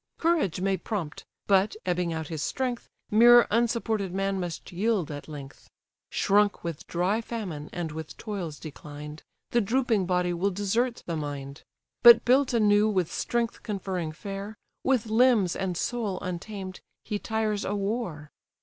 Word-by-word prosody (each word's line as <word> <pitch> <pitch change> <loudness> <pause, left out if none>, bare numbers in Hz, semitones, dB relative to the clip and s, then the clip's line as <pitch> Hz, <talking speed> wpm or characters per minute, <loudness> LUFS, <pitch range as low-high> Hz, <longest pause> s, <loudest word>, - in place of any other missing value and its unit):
Courage 325 - +1
may 195 0 +1
prompt; 180 -5 -5 0.2
but, 195 +1 +3
ebbing 180 -1 0
out 160 -2 -4
his 160 -3 -4
strength, 250 - -2 0.2
Mere 240 +2 +8
unsupported 225 -3 +1
man 195 0 0
must 175 -2 -5
yield 190 -3 0
at 145 0 -7
length; 140 -3 -10 0.4
Shrunk 205 +1 +2
with 170 -3 -5
dry 185 +6 0
famine, 190 -11 -5
and 170 -3 -4
with 160 0 -7
toils 185 -9 -5
declined, 150 0 -9 0.3
The 240 - +3
drooping 225 -3 +1
body 180 -1 +1
will 180 +4 +1
desert 215 +6 -1
the 170 - -3
mind: 145 -2 -5 0.4
But 235 -1 +9
built 260 +2 +4
anew 210 -2 +4
with 185 -5 0
strength 235 -1 -1
conferring 190 -6 -3
fare, 200 +4 -7 0.3
With 255 -4 +2
limbs 220 -4 +3
and 185 -3 -2
soul 220 -5 -2
untamed, 185 +1 -5 0.2
he 210 -2 -3
tires 220 -2 -1
a 205 - -2
war. 195 -8 -3
195 Hz, 150 wpm, -27 LUFS, 170-225 Hz, 0.4 s, But